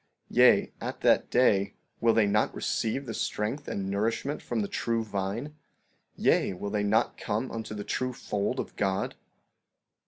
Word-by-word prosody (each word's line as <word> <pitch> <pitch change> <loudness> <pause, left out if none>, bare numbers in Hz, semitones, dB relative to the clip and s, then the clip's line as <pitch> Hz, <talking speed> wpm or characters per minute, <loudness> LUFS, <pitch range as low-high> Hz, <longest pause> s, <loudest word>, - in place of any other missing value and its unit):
Yea, - - +5
at - - -5
that - - +4
day, 100 -5 +3 0.2
will 115 0 +4
they 110 - +5
not 105 +1 +1
receive 130 +5 -1
the 115 - -5
strength 110 +8 -2
and 95 -1 -3
nourishment 115 +8 -1
from 120 -2 -2
the 100 - -1
true 115 +1 -1
vine? 105 +7 -3 0.6
Yea, - - +2
will 100 +3 -5
they 105 -1 0
not 110 +3 +1
come 110 +5 -2
unto 110 -1 -5
the 105 - -4
true 130 +4 -1
fold 105 -4 -2
of - - -5
God? 95 -1 0
110 Hz, 160 wpm, -28 LUFS, 100-115 Hz, 0.6 s, Yea